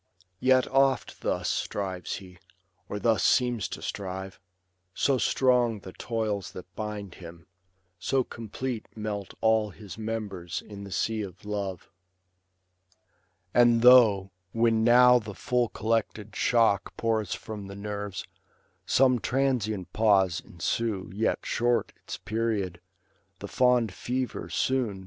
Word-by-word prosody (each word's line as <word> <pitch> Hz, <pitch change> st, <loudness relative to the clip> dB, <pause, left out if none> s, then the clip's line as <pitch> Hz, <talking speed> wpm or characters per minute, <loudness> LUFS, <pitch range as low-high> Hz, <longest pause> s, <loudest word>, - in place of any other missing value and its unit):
Yet 130 Hz, 0 st, +4 dB
oft 135 Hz, 0 st, +1 dB
thus -, -, -1 dB
strives 95 Hz, -3 st, -2 dB
he, 90 Hz, -2 st, -11 dB, 0.5 s
or 105 Hz, -, -3 dB
thus 110 Hz, -3 st, +2 dB
seems 120 Hz, -5 st, +2 dB
to -, -, -8 dB
strive; 95 Hz, -1 st, -5 dB, 0.6 s
So 135 Hz, -2 st, +2 dB
strong 120 Hz, -5 st, +2 dB
the 95 Hz, -, -10 dB
toils 110 Hz, -4 st, -3 dB
that 90 Hz, 0 st, -11 dB
bind 105 Hz, -3 st, -5 dB
him; 85 Hz, -1 st, -11 dB, 0.5 s
so 130 Hz, +7 st, +1 dB
complete 120 Hz, +1 st, -5 dB
Melt 105 Hz, -2 st, -4 dB
all 110 Hz, -1 st, +3 dB
his 100 Hz, 0 st, -11 dB
members 105 Hz, -6 st, -4 dB
in 100 Hz, -1 st, -8 dB
the 100 Hz, -, -10 dB
sea 110 Hz, +3 st, -1 dB
of 95 Hz, -1 st, -8 dB
love. 100 Hz, -4 st, -4 dB, 1.6 s
And 120 Hz, -1 st, +5 dB
though, 110 Hz, -6 st, +7 dB, 0.2 s
when 115 Hz, -1 st, +3 dB
now 125 Hz, +1 st, +7 dB
the 105 Hz, -3 st, -8 dB
full 125 Hz, -2 st, 0 dB
collected 110 Hz, -1 st, -2 dB
shock 115 Hz, -5 st, +2 dB
Pours 110 Hz, -3 st, 0 dB
from 105 Hz, -3 st, -8 dB
the 100 Hz, -, -8 dB
nerves, 105 Hz, -2 st, -5 dB, 0.6 s
some 130 Hz, -2 st, +4 dB
transient 110 Hz, -, -1 dB
pause 100 Hz, -5 st, +3 dB
ensue. 95 Hz, +3 st, -2 dB
Yet 110 Hz, +3 st, -1 dB
short 120 Hz, 0 st, +1 dB
its -, -, -7 dB
period; 105 Hz, -6 st, -2 dB, 0.6 s
the 100 Hz, -, -7 dB
fond 125 Hz, -3 st, +2 dB
fever 125 Hz, +5 st, -3 dB
soon. 125 Hz, -7 st, 0 dB
110 Hz, 125 wpm, -27 LUFS, 100-120 Hz, 1.6 s, though